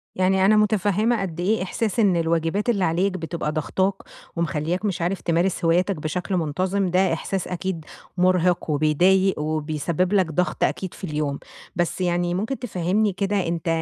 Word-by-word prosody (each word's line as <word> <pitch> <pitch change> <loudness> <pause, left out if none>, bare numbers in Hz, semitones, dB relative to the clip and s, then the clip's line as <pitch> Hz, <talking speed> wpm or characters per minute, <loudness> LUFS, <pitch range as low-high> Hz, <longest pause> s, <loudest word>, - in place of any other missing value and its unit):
يعني 190 +1 +3
أنا 215 - +5
مُتفهمة 210 +2 +2
قدّ 175 -3 -4
إيه 195 +2 +1
إحساس 215 +3 -2
إن 200 -5 +4
الواجبات 165 +5 0
اللي 200 -5 +2
عليك 180 +4 +1
بتبقى 165 -2 -3
ضاغطاك 185 +5 0 0.4
ومخلّياك 170 +4 -1
مش 190 -3 -1
عارف 180 +3 -1
تمارس 170 +1 0
هواياتك 180 +3 +2
بشكل 180 +5 -2
منتظم، 185 +5 0
ده 180 -1 +2
إحساس 190 +3 -3
أكيد 180 -3 -4 0.3
مُرهق 180 -2 +2
وبيضايق 175 +6 +3
وبيسبب 155 +4 -1
لك 190 -2 +4
ضغط 180 +3 0
أكيد 190 -2 -1
في - - -15
اليوم، 150 -4 -2 0.4
بس 175 +1 -1
يعني 175 -1 0
ممكن 220 +9 -2
تفهّمني 200 -2 0
كده 195 -1 -1
أنت 165 0 -3
180 Hz, 155 wpm, -23 LUFS, 165-195 Hz, 0.4 s, أنا